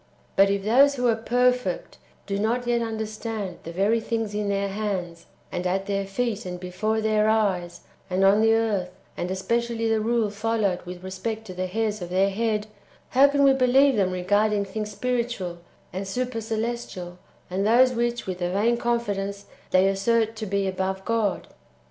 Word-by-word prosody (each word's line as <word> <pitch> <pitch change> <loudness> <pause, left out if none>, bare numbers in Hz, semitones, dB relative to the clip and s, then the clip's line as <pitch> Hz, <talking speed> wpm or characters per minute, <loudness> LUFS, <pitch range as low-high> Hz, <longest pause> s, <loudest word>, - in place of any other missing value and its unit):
But 195 0 +5
if 200 0 0
those 270 +7 +5
who 250 -2 -1
are 230 - +3
ferfect 245 -3 0 0.3
do 200 0 -2
not 235 +4 0
yet 240 -1 +1
understand 220 -3 -4
the 165 - -7
very 200 +6 +2
things 225 -2 -2
in 205 -1 -1
their 200 0 0
hands, 190 -5 -4 0.2
and 180 +1 -2
at 190 +2 -1
their 195 -1 -2
feet, 225 +1 -2
and 180 -1 -6
before 190 +5 -1
their 215 0 +2
eyes, 185 -6 0 0.3
and 185 +1 +1
on 200 +2 +5
the 225 0 +5
earth, 210 -5 0 0.3
and 175 - -3
especially 230 +4 -1
the 220 -1 +2
rule 225 -1 +1
followed 210 -3 0
with 180 0 -8
respect 215 +4 -4
to 185 - -8
the 185 +1 -3
hairs 215 +1 -1
of 175 - -5
their 190 +2 +2
head, 215 0 0 0.4
how 270 +2 +6
can 285 0 +2
we 275 -1 +6
believe 265 +1 +4
them 195 -3 +2
regarding 205 +3 +1
things 215 +1 -4
spiritual, 230 -5 -2 0.3
and 190 +1 -4
super 245 +3 -2
celestial, 220 -5 -4 0.3
and 190 +3 -1
those 250 +3 +5
which, 240 0 -1
with 185 -1 -5
a 175 - 0
vain 215 +6 +2
confidence, 205 -4 -2 0.2
they 185 +1 +4
assert 225 +3 +1
to 220 -1 -5
be 200 0 0
above 190 0 -2
God? 230 -3 0
210 Hz, 180 wpm, -25 LUFS, 190-230 Hz, 0.4 s, how